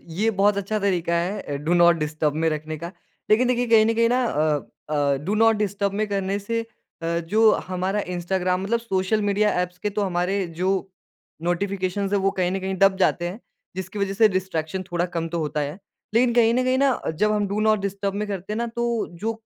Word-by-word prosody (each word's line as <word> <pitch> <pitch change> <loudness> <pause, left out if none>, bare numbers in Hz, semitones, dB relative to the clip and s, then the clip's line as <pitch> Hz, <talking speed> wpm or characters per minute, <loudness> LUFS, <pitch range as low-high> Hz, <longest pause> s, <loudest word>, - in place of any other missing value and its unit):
ये 200 +7 0
बहुत 205 0 +2
अच्छा 200 +2 -1
तरीका 180 -4 0
है 175 -4 -3
डू 170 - +2
नॉट 175 0 +6
डिस्टर्ब 150 -1 -1
में - - +4
रखने 155 +1 -4
का 170 +3 -7 0.4
लेकिन 235 +4 +4
देखिए 245 0 +1
कहीं 225 -2 +6
न 225 - +2
कहीं 230 0 +3
ना 250 +1 +2
अ 155 -8 +1 0.3
अ, 145 -2 +2
डू 185 +8 -2
नॉट 225 0 +4
डिस्टर्ब 200 -1 -1
में 215 - +1
करने 195 0 -1
से 230 +3 -2 0.4
अ, 170 0 0
जो 215 +7 +4 0.2
हमारा 185 +3 -1 0.2
इंस्टाग्राम 180 +1 -1
मतलब 230 +4 0
सोशल 210 -1 0
मीडिया 210 +1 +2
एप्स 180 0 -4
के 210 - -2
तो - - +2
हमारे 185 +1 0
जो 185 +1 +2 0.7
नोटिफिकेशंस 190 +2 -1
हैं 205 - +3
वो 195 - +4
कहीं 185 -2 0
न 195 - -2
कहीं 190 0 -2
दब 195 0 +5
जाते 175 -2 +1
हैं। 195 +6 -8 0.4
जिसकी 190 +2 -5
वज़ह 200 -1 0
से 220 +1 +5
डिस्ट्रैक्शन 185 -2 -2
थोड़ा 175 0 0
कम 165 -1 -1
तो 170 +1 -3
होता 150 -1 -2
है। 145 +4 -4 0.4
लेकिन 240 +1 +4
कहीं 230 -1 +5
न 255 - +2
कहीं 255 +1 +2
ना 275 -2 +2 0.2
जब 210 0 +3
हम 210 -1 +1
डू 205 +2 -1
नॉट 215 0 +3
डिस्टर्ब 200 0 -2
में 210 +1 -2
करते 195 0 -4
हैं 215 - -2
ना, 235 - -1
तो 235 0 -1
जो 205 +7 -3
195 Hz, 220 wpm, -23 LUFS, 175-215 Hz, 0.7 s, नॉट